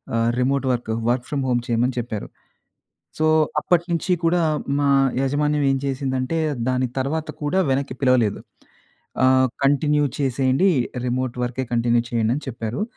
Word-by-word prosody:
ఆహ్, 115 0 +2
remote 135 +2 +1
work, 120 -2 -3 0.2
work 120 0 0
from 140 -2 -1
home 120 -1 +1
చేయమని 120 +1 +1
చెప్పారు. 110 -3 -5 0.9
సో, 155 - +2 0.3
అప్పటినుంచి 170 +1 0
కూడా 170 +1 +3 0.4
మా 140 - +2 0.3
యాజమాన్యం 145 +2 +1
ఏం 135 - +1
చేసిందంటే, 135 +2 -2 0.3
దాని 130 0 0
తర్వాత 155 +4 -2
కూడా 150 +6 +1
వెనక్కి 135 -1 -1
పిలవలేదు. 125 -6 +2 0.8
ఆ! - - +6 0.4
కంటిన్యూ 145 +1 +2
చేసేయండి 135 +5 +2 0.4
రిమోట్ 125 0 -2
వర్కెే 125 +2 -3
కంటిన్యూ 120 0 +2
చేయండి 115 0 +1
అని 150 - -6
చెప్పారు. 115 - -4
130 Hz, 135 wpm, -22 LUFS, 120-145 Hz, 0.9 s, ఆ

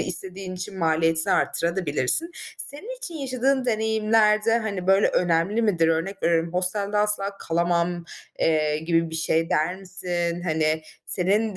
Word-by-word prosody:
istediğin 185 +1 -5
için 185 +1 -7
maliyetini 165 -1 +2
arttırabilirsin 170 - 0
de. 345 - -17 0.3
Senin 425 - -6
için 435 -9 -5
yaşadığın 265 -2 0
deneyimler 220 -2 +2
de, 225 +1 +3
hani, 200 -5 -4
böyle, 195 +1 +4
önemli 180 +6 +1
midir? 175 -7 +2
Örnek 165 +5 -1
veriyorum: 165 0 +1
Hostelde 200 +3 -1
asla 200 -1 0
kalamam, 170 +1 0 0.3
eee, 155 -1 +2
gibi 165 +1 0
bir - - -7
şey 165 +1 0
der 160 +4 +1
misin? 175 -2 -3
Hani, 155 -2 0 0.2
senin 200 +3 +1
185 Hz, 140 wpm, -24 LUFS, 165-210 Hz, 0.3 s, böyle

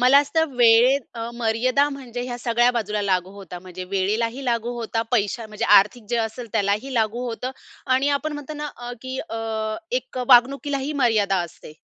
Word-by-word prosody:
मला 255 +3 +7
असतं 295 0 0
वेळेत 240 +3 +6
अ, 230 - -6
मर्यादा 240 +5 +1
म्हणजे 250 -3 -6
ह्या 245 -1 -5
सगळ्या 240 0 +2
बाजूला 210 -3 -2
लागू 185 -2 0
होता. 190 -3 -9
म्हणजे 185 0 -8
वेळेलाही 225 +7 -1
लागू 235 -1 -1
होता, 225 0 -2
पैशा 220 0 0
म्हणजे 215 -1 -4
आर्थिक 215 +4 -1
जे 240 - +1
असेल 235 +2 -8
त्यालाही 210 +5 0
लागू 230 +1 0
होतं. 245 +2 -4 0.4
आणि 270 +2 +2
आपण 310 +2 -4
म्हणतो 295 0 -7
ना 295 0 -4
अ, 240 0 -7
की 260 0 -5 0.8
एक - - -5
वागणुकीला 275 +3 +4
ही 300 - -2
मर्यादा 210 -5 +3
असते. 155 - -14
240 Hz, 170 wpm, -23 LUFS, 215-260 Hz, 0.8 s, मला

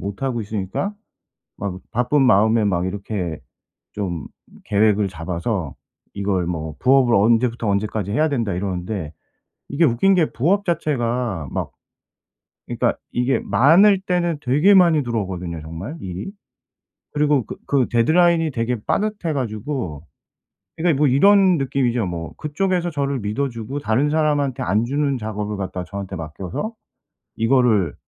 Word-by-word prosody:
못하고 120 +5 -3
있으니까 105 - -3 0.7
막 95 -2 -4
바쁜 125 +5 +1
마음에 110 -1 +4
막 90 -3 +1
이렇게 95 -4 -4 0.5
좀 90 -7 -4 0.4
계획을 105 -1 +2
잡아서 85 - -3 0.4
이걸 100 -3 -1
뭐 80 -3 -4
부업을 130 -2 +4
'언제부터 115 +2 +2
언제까지 100 0 -1
해야 155 +7 +2
된다.' 115 -9 -1
이러는데 90 -3 -4 0.6
이게 155 +4 +1
웃긴 145 +11 +3
게 170 -4 +2
부업 190 - +1
자체가 120 - -1
막 - - -4 1.0
이 - - -4
그러니까 - - +1
이게 125 +2 0
많을 185 - +5
때는 175 -4 -1
되게 150 +11 +3
많이 170 -6 +5
들어오거든요 95 -8 -3
정말 85 - -7
일이. 95 - -6 0.8
그리고 145 -3 +2
그 - - -7
그 135 -4 +2
데드라인이 165 +5 +3
되게 120 +1 -1
빠듯해 210 -6 -1
가지고 110 - -4 0.7
그러니까 160 -4 +1
뭐 150 - +5
이런 190 +6 +5
느낌이죠 130 -4 0
뭐. 85 -2 -5
그쪽에서 175 +3 -1
저를 140 -3 -2
믿어주고 115 +3 -3
다른 135 +4 +1
사람한테 145 -4 +1
안 105 +6 +1
주는 140 +1 0
작업을 105 -2 -4
갖다가 95 -2 -4
저한테 100 -1 -6
맡겨서 90 - -5 0.6
이거를 115 - +2
120 Hz, 310 characters per minute, -21 LUFS, 100-145 Hz, 1.0 s, 많을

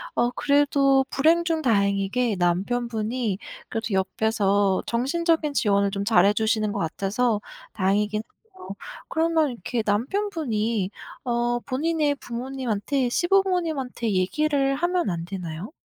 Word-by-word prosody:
어, 240 +1 +2
그래도 280 -1 +3
불행 325 +4 +3
중 325 -2 0
다행이게 200 -1 +1
남편분이 220 +4 -1 0.3
그래도 225 +1 -3
옆에서 200 0 +1
정신적인 305 +5 +1
지원을 200 -5 +2
좀 200 0 -2
잘해 200 -2 +5
주시는 215 -1 +1
것 - - -3
같아서 205 +6 0 0.3
다행이긴 205 +2 +1
해요. 375 - -16 0.4
그러면 320 -2 +2
이렇게 230 0 -3
남편분이 230 - -1 0.4
어, 240 0 0
본인의 295 +3 0
부모님한테 250 0 -2
시부모님한테 335 - 0
얘기를 275 +8 +1
하면 345 - 0
안 165 -1 -3
되나요? 180 - -6
240 Hz, 295 characters per minute, -24 LUFS, 205-290 Hz, 0.4 s, 잘해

